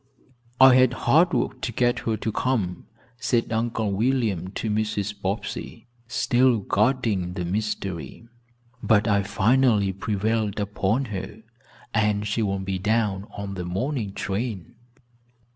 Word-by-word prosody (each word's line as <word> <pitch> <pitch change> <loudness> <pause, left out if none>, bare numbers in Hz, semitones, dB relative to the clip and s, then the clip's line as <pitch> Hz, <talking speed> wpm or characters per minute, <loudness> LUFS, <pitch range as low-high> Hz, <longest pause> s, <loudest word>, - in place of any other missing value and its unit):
"I 130 0 +9
had 130 -1 +5
hard 160 +9 +5
work 130 - -1
to 120 - -2
get 120 +1 +1
her 110 -1 -1
to 110 - -2
come," 105 -8 -1 0.3
said 120 -2 0
Uncle 110 -2 -1
William 110 -4 0
to - - -3
Mrs. 105 -1 -1
Bobbsey, 100 +5 -4 0.2
still 125 +1 +3
guarding 105 -4 +1
the 90 -2 -3
mystery, 95 - -4 0.5
"but 110 -1 +3
I 100 -1 +3
finally 105 0 +2
prevailed 105 +1 -1
upon 105 +5 0
her 100 +3 -6 0.5
and 105 -1 +1
she 105 +2 -1
will 100 -2 0
be 95 -1 -3
down 105 -1 0
on 100 -1 -5
the 90 -2 -4
morning 105 +4 -2
train." 100 -3 -4
105 Hz, 130 wpm, -24 LUFS, 100-120 Hz, 0.5 s, I